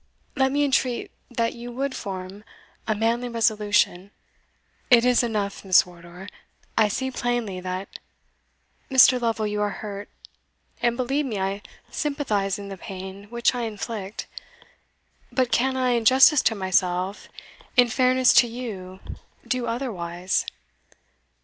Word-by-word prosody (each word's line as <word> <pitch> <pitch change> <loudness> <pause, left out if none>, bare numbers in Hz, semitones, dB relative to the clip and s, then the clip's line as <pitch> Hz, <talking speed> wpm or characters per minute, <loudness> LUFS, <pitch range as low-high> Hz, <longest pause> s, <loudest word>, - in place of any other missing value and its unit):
Let 265 -1 +2
me 290 +1 +2
entreat 260 -3 0 0.2
that 230 -2 -1
you 240 +1 -8
would 270 +2 -2
form 195 -1 -6 0.4
a 220 - +1
manly 230 +3 0
resolution" 210 -4 +1 0.8
"It 245 -2 +6
is 250 -1 +4
enough, 210 -4 -2
Miss 185 -2 +5
Wardour; 175 +1 -12 0.5
I 220 - +4
see 260 +6 -2
plainly 240 -6 -2
that" 185 +1 -6 0.9
"Mr. 255 -1 +6
Lovel, 225 -2 0
you 210 0 -2
are 205 - +1
hurt 205 0 -7 0.7
and, 240 0 +1
believe 270 +3 0
me, 220 -5 -3
I 195 +1 -2 0.3
sympathize 220 -10 -1
in 200 -1 -8
the 195 - -7
pain 190 +2 -8
which 235 +3 +1
I 245 - -3
inflict; 215 -2 -5 1.1
but 255 -2 0
can 260 +3 +2
I, 255 -1 +2
in 235 -1 +1
justice 265 +4 +7
to 225 - -5
myself, 185 0 0 0.5
in 245 -1 +7
fairness 255 +1 +4
to 245 - -3
you, 205 -6 -7 0.5
do 250 -1 -1
otherwise? 185 -7 -2
225 Hz, 135 wpm, -24 LUFS, 195-250 Hz, 1.1 s, justice